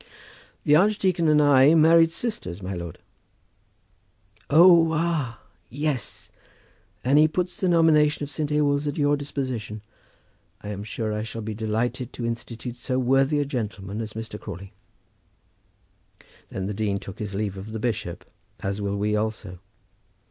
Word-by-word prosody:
"The 150 Hz, -, +5 dB
archdeacon 185 Hz, -2 st, +2 dB
and 150 Hz, -1 st, +5 dB
I 145 Hz, +1 st, +6 dB
married 165 Hz, +1 st, +6 dB
sisters, 105 Hz, -, -4 dB
my 95 Hz, +1 st, -4 dB
lord." 85 Hz, -3 st, -6 dB, 1.5 s
"Oh, 170 Hz, +1 st, +7 dB
ah! 155 Hz, -7 st, -1 dB, 0.3 s
yes. 140 Hz, -3 st, -3 dB, 0.7 s
And 135 Hz, +4 st, +4 dB
he 155 Hz, -, +6 dB
puts 180 Hz, +3 st, -3 dB
the 185 Hz, -, +1 dB
nomination 155 Hz, -3 st, +4 dB
of 145 Hz, -, -6 dB
St. 150 Hz, -1 st, -2 dB
Ewolds 145 Hz, -1 st, +1 dB
at 145 Hz, -, -3 dB
your 145 Hz, -1 st, +3 dB
disposition. 130 Hz, -7 st, -4 dB, 0.8 s
I 105 Hz, -, -7 dB
am 100 Hz, -1 st, -5 dB
sure 110 Hz, 0 st, -3 dB
I 105 Hz, -, -2 dB
shall 115 Hz, 0 st, -6 dB
be 110 Hz, 0 st, -4 dB
delighted 115 Hz, +4 st, -2 dB
to 120 Hz, -, -5 dB
institute 115 Hz, +1 st, -5 dB
so 125 Hz, +1 st, -2 dB
worthy 135 Hz, +3 st, +2 dB
a -, -, -1 dB
gentleman 105 Hz, -5 st, -4 dB
as 110 Hz, -1 st, -6 dB
Mr. 110 Hz, -1 st, -7 dB
Crawley." 100 Hz, 0 st, -9 dB, 1.8 s
Then 95 Hz, -, -4 dB
the 105 Hz, -, -3 dB
dean 100 Hz, -1 st, -1 dB
took 95 Hz, -1 st, -9 dB
his 105 Hz, -2 st, -4 dB
leave 100 Hz, -1 st, -2 dB
of 95 Hz, +3 st, -8 dB
the 110 Hz, -, -4 dB
bishop, 105 Hz, -7 st, -3 dB, 0.3 s
as 100 Hz, +1 st, -3 dB
will 100 Hz, 0 st, -2 dB
we 105 Hz, +1 st, 0 dB
also. 105 Hz, -4 st, -3 dB
120 Hz, 150 wpm, -25 LUFS, 105-150 Hz, 1.8 s, Oh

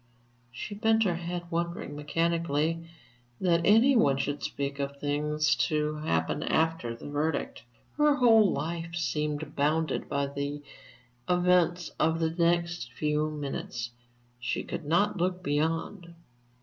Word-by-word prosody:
She 130 Hz, -, -6 dB
bent 220 Hz, +1 st, +3 dB
her 175 Hz, -5 st, 0 dB
head, 175 Hz, 0 st, -4 dB
wondering 170 Hz, -3 st, -3 dB
mechanically 165 Hz, +1 st, 0 dB, 0.5 s
that 170 Hz, -2 st, +2 dB
any 225 Hz, +8 st, +5 dB
one 140 Hz, -, +4 dB
should 145 Hz, +1 st, -2 dB
speak 140 Hz, 0 st, -3 dB
of 140 Hz, 0 st, -3 dB
things 150 Hz, +1 st, +1 dB
to 150 Hz, 0 st, -1 dB
happen 80 Hz, -, -1 dB
after 160 Hz, -8 st, 0 dB
the 115 Hz, -, -10 dB
verdict. 150 Hz, +2 st, -2 dB, 0.4 s
Her 295 Hz, -1 st, +5 dB
whole 225 Hz, -6 st, +5 dB
life 170 Hz, +2 st, -3 dB
seemed 150 Hz, -3 st, -2 dB
bounded 155 Hz, +3 st, 0 dB
by 140 Hz, 0 st, 0 dB
the 140 Hz, +1 st, -4 dB, 0.7 s
events 180 Hz, -1 st, +2 dB
of 160 Hz, +1 st, +2 dB
the 160 Hz, -1 st, +1 dB
next 170 Hz, -5 st, 0 dB
few 150 Hz, +2 st, 0 dB
minutes; 135 Hz, -5 st, -5 dB, 0.5 s
she 125 Hz, -, -2 dB
could 170 Hz, -, -6 dB
not 195 Hz, +7 st, +2 dB
look 180 Hz, +1 st, -1 dB
beyond.... 165 Hz, +4 st, -2 dB
160 Hz, 130 wpm, -29 LUFS, 145-175 Hz, 0.7 s, any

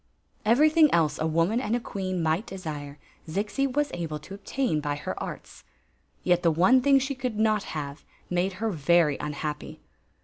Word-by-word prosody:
Ev^ytliing 305 Hz, +6 st, +5 dB
else 155 Hz, -3 st, +2 dB
a 160 Hz, -, +1 dB
woman 165 Hz, +9 st, +1 dB
and 230 Hz, -2 st, 0 dB
a -, -, 0 dB
queen 185 Hz, -6 st, -3 dB
might 160 Hz, +7 st, 0 dB
desire 150 Hz, -6 st, -6 dB, 0.3 s
Zixi 210 Hz, +10 st, -1 dB
was 290 Hz, +2 st, 0 dB
able 165 Hz, -3 st, -3 dB
to 150 Hz, +6 st, -11 dB
obtain 200 Hz, -, -1 dB
by 145 Hz, -1 st, -2 dB
her 145 Hz, -, -4 dB
arts. -, -, -8 dB, 0.6 s
Yet 175 Hz, -1 st, +3 dB
the 170 Hz, -, +4 dB
one 185 Hz, +11 st, +4 dB
thing 275 Hz, +1 st, +5 dB
she 270 Hz, +1 st, 0 dB
could 255 Hz, -5 st, -4 dB
nof 215 Hz, -1 st, +2 dB, 0.2 s
have 145 Hz, 0 st, -6 dB, 0.2 s
made 180 Hz, +2 st, 0 dB
her 220 Hz, +4 st, -2 dB
very 165 Hz, -2 st, +3 dB
unhappy. 150 Hz, 0 st, -5 dB
185 Hz, 170 wpm, -27 LUFS, 155-230 Hz, 0.6 s, Ev^ytliing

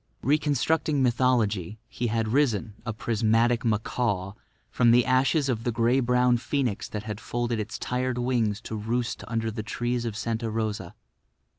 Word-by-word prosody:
Reconstructing 150 Hz, +1 st, +1 dB
mythology, 115 Hz, -6 st, +1 dB
he 120 Hz, -, -3 dB
had 115 Hz, -1 st, 0 dB
risen, 115 Hz, -5 st, +1 dB
a -, -, 0 dB
prismatic 115 Hz, +2 st, +1 dB
macaw, 105 Hz, -3 st, -1 dB, 0.4 s
from 120 Hz, -2 st, +3 dB
the 120 Hz, +1 st, +5 dB
ashes 135 Hz, +3 st, +2 dB
of 115 Hz, -4 st, -1 dB
the 120 Hz, -, 0 dB
grey 115 Hz, +3 st, +2 dB
brown 125 Hz, 0 st, +3 dB
phoenix 125 Hz, -3 st, -2 dB
that 105 Hz, -1 st, -5 dB
had 105 Hz, -1 st, -5 dB
folded 120 Hz, -1 st, -2 dB
its 105 Hz, +1 st, -4 dB
tired 125 Hz, 0 st, -2 dB
wings 120 Hz, -4 st, 0 dB
to 110 Hz, -, -6 dB
roost 115 Hz, +2 st, -2 dB
under 115 Hz, -1 st, -1 dB
the 110 Hz, 0 st, -4 dB
trees 120 Hz, +2 st, -2 dB
of 110 Hz, -3 st, -3 dB
Santa 115 Hz, 0 st, -2 dB
Rosa. 110 Hz, -4 st, -3 dB
115 Hz, 155 wpm, -26 LUFS, 110-125 Hz, 0.4 s, the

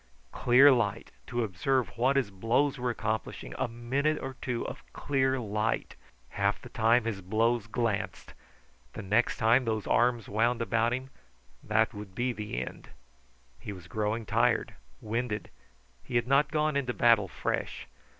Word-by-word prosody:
Clear 130 Hz, +4 st, +6 dB
light, 115 Hz, -6 st, 0 dB, 0.2 s
to 120 Hz, -2 st, -1 dB
observe 110 Hz, +4 st, 0 dB
what 130 Hz, +4 st, +2 dB
his 130 Hz, -7 st, +1 dB
blows 115 Hz, +8 st, +1 dB
were 125 Hz, 0 st, -1 dB
accomplishing; 110 Hz, -, -3 dB
a -, -, +1 dB
minute 130 Hz, +6 st, -1 dB
or 135 Hz, 0 st, -6 dB
two 125 Hz, -4 st, -2 dB
of -, -, -7 dB
clear 130 Hz, -2 st, 0 dB
light! 110 Hz, 0 st, -2 dB, 0.3 s
Half 100 Hz, +1 st, 0 dB
the 125 Hz, -, -9 dB
time 120 Hz, -1 st, +3 dB
his 105 Hz, -4 st, -3 dB
blows 115 Hz, +4 st, +1 dB
glanced. 115 Hz, -3 st, -2 dB, 0.6 s
The -, -, -7 dB
next 110 Hz, +5 st, +1 dB
time 115 Hz, +4 st, +4 dB
those 110 Hz, -3 st, -2 dB
arms 120 Hz, -2 st, +2 dB
wound 115 Hz, +4 st, +1 dB
about 115 Hz, 0 st, +1 dB
him, 130 Hz, +2 st, -4 dB, 0.5 s
that 110 Hz, +2 st, +1 dB
would 105 Hz, -3 st, -9 dB
be 125 Hz, +1 st, 0 dB
the 105 Hz, -, -4 dB
end. -, -, -11 dB, 0.7 s
He 105 Hz, -, -7 dB
was 90 Hz, -3 st, -10 dB
growing 110 Hz, +4 st, -2 dB
tired, 115 Hz, +2 st, +1 dB, 0.3 s
winded; 110 Hz, 0 st, -3 dB, 0.5 s
he 120 Hz, -, -7 dB
had 120 Hz, -1 st, +3 dB
not 140 Hz, +2 st, +3 dB
gone 155 Hz, -1 st, 0 dB
into 130 Hz, -3 st, -1 dB
battle 115 Hz, -4 st, +4 dB
fresh. -, -, -3 dB
115 Hz, 155 wpm, -29 LUFS, 105-125 Hz, 0.7 s, Clear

